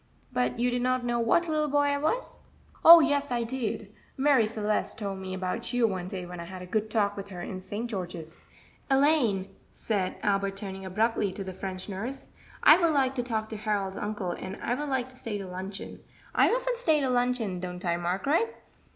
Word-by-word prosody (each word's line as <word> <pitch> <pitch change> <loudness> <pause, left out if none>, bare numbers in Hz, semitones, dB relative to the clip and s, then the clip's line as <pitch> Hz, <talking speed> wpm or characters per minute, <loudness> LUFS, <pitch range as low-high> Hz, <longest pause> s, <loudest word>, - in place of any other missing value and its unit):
"But 250 -1 0
you 245 +1 +1
did 245 0 0
not 255 0 +1
know 240 0 0
what 290 +9 +3
little 305 -1 +1
boy 290 +1 +3
I 285 0 0
was?" 460 +13 -2 0.4
"Oh, 335 0 +11
yes, 285 -1 +1
I 240 -1 0
did; 225 -4 -4 0.2
Marie 270 -5 +4
Celeste 215 -1 -1
told 200 -3 -4
me 190 0 -5
about 185 +5 -3
you 245 -1 +3
one 185 -3 -3
day 185 -1 -5
when 180 0 -8
I 170 - -6
had 185 +1 -8
a - - -7
good 215 +4 -1
talk 205 -2 +1
with 200 0 -6
her 180 -3 -8
in 185 +1 -5
St. 210 +5 -4
George's." 175 -6 -6 0.5
"Elaine," 260 -9 +3
said 195 -4 -2
Albert, 195 -1 0
turning 195 -1 -6
abruptly 210 +1 +1
to 195 - -5
the 190 -1 -6
French 185 0 -6
nurse, 220 +7 -5 0.3
"I 315 - +8
would 340 -2 +3
like 270 -2 +2
to 255 - -1
talk 220 -3 -2
to 220 - -5
Harold's 205 -3 -1
uncle, 205 -4 -3
and 190 +3 -6
I 240 - -1
would 290 +3 -3
like 260 -2 0
to 260 - -14
stay 220 -4 -4
to 195 - -6
luncheon 190 +2 -7 0.3
I - - +5
often - - 0
stay 320 -11 +3
to 270 - +1
luncheon, 245 -6 0
don't 180 0 -6
I, 170 -1 +2
Margaret?" 275 - 0
215 Hz, 210 wpm, -28 LUFS, 190-260 Hz, 0.5 s, Oh